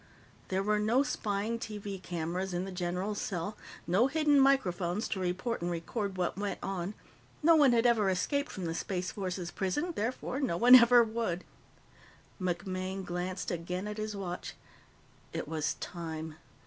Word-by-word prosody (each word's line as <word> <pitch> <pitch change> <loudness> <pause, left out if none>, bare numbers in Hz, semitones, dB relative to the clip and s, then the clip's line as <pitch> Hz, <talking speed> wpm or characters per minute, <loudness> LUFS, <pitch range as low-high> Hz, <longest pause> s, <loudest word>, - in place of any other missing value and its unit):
There 190 +1 0
were 210 +1 +2
no 230 +6 +3
spying 220 -3 -2
TV 205 -4 -6
cameras 175 +1 -3
in 180 +2 -1
the 195 - -6
general's 180 +3 -2
cell, 195 +2 -3 0.3
no 195 +9 +4
hidden 295 -1 +3
microphones 205 -7 +2
to 195 - -2
report 185 +6 -2
and 175 - -1
record 190 +4 -3
what 180 +1 -1
went 205 0 -2
on. 195 +1 -3 0.5
No 330 +1 +7
one 290 -5 +6
had 235 0 +3
ever 225 -5 +4
escaped 280 +10 0
from 185 - -5
the 165 - -1
Space 180 +1 -2
Force's 185 -3 -4
prison, 295 - -1
therefore, 250 +4 -2
no 250 -12 0
one 245 +6 +7
ever 240 -1 +9
would. 220 -6 -2 1.0
MacMaine 185 +1 -2
glanced 180 0 -3
again 180 +3 -3
at 210 0 -5
his 215 -1 -3
watch. 180 -3 -5 0.8
It - - -3
was 155 -1 -1
time. 160 -2 -6
195 Hz, 160 wpm, -31 LUFS, 180-230 Hz, 1.0 s, ever